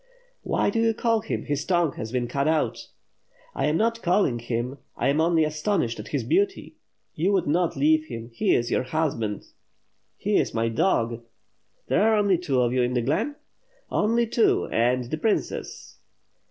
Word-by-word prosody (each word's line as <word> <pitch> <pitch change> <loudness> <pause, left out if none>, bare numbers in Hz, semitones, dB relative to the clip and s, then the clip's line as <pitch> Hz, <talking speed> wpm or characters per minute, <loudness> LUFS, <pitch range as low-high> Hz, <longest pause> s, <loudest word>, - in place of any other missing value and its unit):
"Why - - 0
do 225 - 0
you 225 -1 +2
call 230 0 +1
him, - - -4
his 145 -1 -2
tongue 175 -4 +1
has 110 0 -6
been 125 -1 -1
cut 140 +4 -1
out." 155 0 0 0.7
"I - - 0
am 150 +2 +1
not 230 +2 0
calling 175 - +2
him, 120 +3 -3 0.2
I 130 - +1
am 145 +3 +2
only 165 -1 +3
astonished 155 - -1
at - - -7
his - - -2
beauty. 390 +3 0 0.4
You 175 +6 0
would 190 - +2
not 170 +3 +1
leave 155 +2 +3
him; 115 -4 -8
he 115 - +2
is 120 0 -1
your - - +2
husband." 130 -7 -2 0.7
"He - - +1
is - - 0
my 115 0 +1
dog." 115 -3 0 0.7
"There - - +2
are 220 +1 +4
only 200 -4 +2
two 140 -8 0
of 120 0 +1
you 130 - +2
iii 125 0 0
the 120 -2 0
glen?" 215 - -1 0.6
"Only 230 +3 +2
two 225 0 +2
— - - -15
and 125 +2 +2
the 125 +6 -4
princess." 215 +5 -3
155 Hz, 185 wpm, -25 LUFS, 120-200 Hz, 0.7 s, are